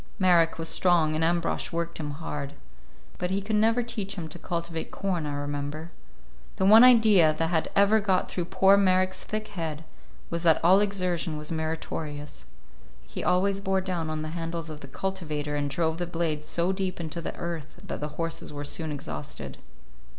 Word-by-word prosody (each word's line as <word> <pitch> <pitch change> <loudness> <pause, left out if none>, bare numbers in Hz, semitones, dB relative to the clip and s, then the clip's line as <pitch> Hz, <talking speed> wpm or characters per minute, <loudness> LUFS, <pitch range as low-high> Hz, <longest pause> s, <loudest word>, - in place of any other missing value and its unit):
Marek 175 -3 +4
was 165 0 -3
strong, 165 -3 +3
and 155 +1 0
Ambrosch 170 +1 0
worked 170 0 -3
him 150 -2 -3
hard; 145 -1 -5 0.7
but 180 - -1
he 190 +1 0
could 210 +2 -2
never 225 +3 +3
teach 210 -4 -4
him 170 -5 -5
to 170 - -8
cultivate 170 -1 -4
corn, 180 -6 -2
I 145 - -3
remember. 145 +3 -4 0.6
The 190 - 0
one 220 +4 +9
idea 215 -10 +6
that 165 +1 0
had 160 -2 +1
ever 200 +2 +5
got 195 -3 +1
through 175 - -3
poor 190 +2 +5
Marek's 185 -1 +2
thick 215 0 -4
head 165 -6 -4 0.5
was 170 0 -1
that 165 -2 +4
all 185 +3 +7
exertion 185 -6 0
was 150 +1 -5
meritorious. 155 -2 -4 0.6
He - - -6
always 195 +2 +2
bore 190 -1 +1
down 175 -4 -3
on 155 0 -3
the 155 - -4
handles 165 0 -4
of 150 - -8
the 140 - -10
cultivator 150 -3 -3
and 145 -1 -1
drove 160 +3 -1
the 175 - -2
blades 160 -3 -2
so 170 +3 +1
deep 190 -1 -2
into 170 0 -4
the - - -5
earth 165 -3 -5
that - - -5
the 150 - -1
horses 165 -1 -3
were 145 -1 -5
soon 155 +2 -4
exhausted. 75 - -6
170 Hz, 185 wpm, -27 LUFS, 155-190 Hz, 0.7 s, one